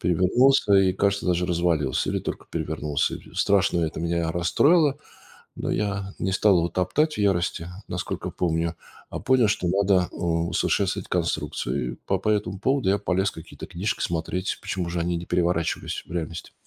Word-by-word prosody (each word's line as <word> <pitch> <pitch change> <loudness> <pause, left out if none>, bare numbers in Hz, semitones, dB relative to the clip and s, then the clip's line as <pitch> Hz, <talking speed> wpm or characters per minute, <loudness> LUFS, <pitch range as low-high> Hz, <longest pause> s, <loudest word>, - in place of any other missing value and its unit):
Перевернулся 100 +7 +3
и, 95 -1 +5
кажется, 100 +1 0
даже 90 0 +2
развалился 85 -6 0
или - - -1
только - - -5
перевернулся 75 -2 -1
и - - -12
страшно 95 -3 +2
это 80 -1 -2
меня 85 -1 0
расстроило. 140 - +3 0.6
Но - - -3
я 100 -1 -2
не 95 - -1
стал 100 0 +4
его 85 0 +2
топтать 150 - 0
в - - -8
ярости, 90 -4 0 0.2
насколько - - -4
помню, 85 -1 -1 0.4
а - - -4
понял 130 -4 +3
что 95 -3 0
надо 95 -1 +3
усовершенствовать 85 -1 0
конструкцию - - -2
и - - -7
по 95 - +1
по 110 +3 0
этому 105 -2 -1
поводу 130 -1 +1
я 100 - +4
полез 95 0 0
какие-то 80 0 -10
книжки 90 +5 -3
смотреть, 85 +2 -2
почему 90 -3 -3
же 85 0 -3
они 85 +1 0
не 85 - -6
переворачивались 85 -2 -1
в - - -11
реальности. 85 -1 -5
90 Hz, 165 wpm, -25 LUFS, 85-100 Hz, 0.6 s, и